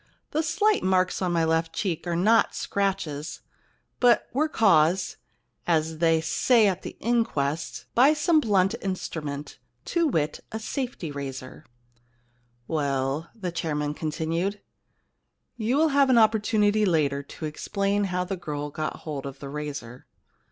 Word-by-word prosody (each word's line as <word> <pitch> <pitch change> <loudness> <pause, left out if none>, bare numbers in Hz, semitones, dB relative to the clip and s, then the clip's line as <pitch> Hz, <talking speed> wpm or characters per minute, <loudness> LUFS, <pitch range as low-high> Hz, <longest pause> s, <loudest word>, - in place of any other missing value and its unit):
* - - -49
The 310 - +1
slight 410 +6 +2
marks 185 0 +1
on 180 -2 0
my 170 -1 +2
left 165 0 +1
cheek 180 -2 -2
are 170 - 0
not 220 +6 +3
scratches, 165 -7 -2 0.6
but 245 -1 +4
were 305 +5 +1
caused 185 - +3 0.2
— 115 -2 -41
as 160 0 -4
they 165 -1 +3
say 220 +8 +3
at 190 -2 -1
the - - -8
inquests 165 -11 -1
— - - -48
by 270 +5 +6
some 310 +2 +3
blunt 195 -7 +2
instrument, 150 -6 -5 0.3
to 340 -2 +1
wit, 155 - -1
a 220 - -3
safety 240 - -4
razor.' 135 -2 -7 0.5
* 120 0 -41
Well,' 140 +2 -1
the 185 -6 -4
chairman 150 -3 -2
continued, 165 +6 -2 0.5
* - - -52
you 240 +3 0
will 320 +1 +4
have 280 -1 +4
an 255 - +5
opportunity 215 -1 +3
later 150 -7 +2
to 140 +3 -8
explain 200 +6 -1
how 180 -1 -1
the 190 +2 -3
girl 150 -3 -5
got 155 +1 -4
hold 145 -3 -4
of 135 0 -8
the 140 0 -8
razor. 140 -5 -6
170 Hz, 155 wpm, -26 LUFS, 150-215 Hz, 0.6 s, by